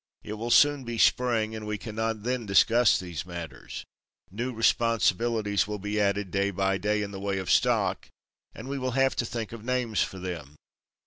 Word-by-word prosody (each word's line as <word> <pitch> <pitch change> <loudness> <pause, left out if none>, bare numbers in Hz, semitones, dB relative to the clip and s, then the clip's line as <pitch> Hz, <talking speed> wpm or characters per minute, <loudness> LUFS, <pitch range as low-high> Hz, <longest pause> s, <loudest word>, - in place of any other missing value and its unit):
It 105 - -6
will 115 +2 -4
soon 145 +2 +5
be 120 -1 -5
Spring, 115 -2 +2
and 110 -1 -6
we 105 0 -2
cannot 110 0 -3
then 125 -2 -2
discuss 115 +4 +5
these 90 -3 -5
matters. 85 -2 -8 0.5
New 120 +6 -3
responsibilities 115 -3 +1
will 105 0 -3
be 105 +1 -2
added 100 -2 0
day 100 0 +1
by 95 0 0
day 105 +1 0
in 100 - -5
the 95 - -7
way 100 0 -2
of 95 -1 -2
stock, - - +2 0.5
and 110 - -9
we 140 0 -3
will 130 -1 -2
have 135 0 +3
to 120 - 0
think 115 -3 -4
of 115 -2 -9
names 125 -3 0
for 95 - -2
them. 85 -6 -6
110 Hz, 190 wpm, -27 LUFS, 100-120 Hz, 0.5 s, soon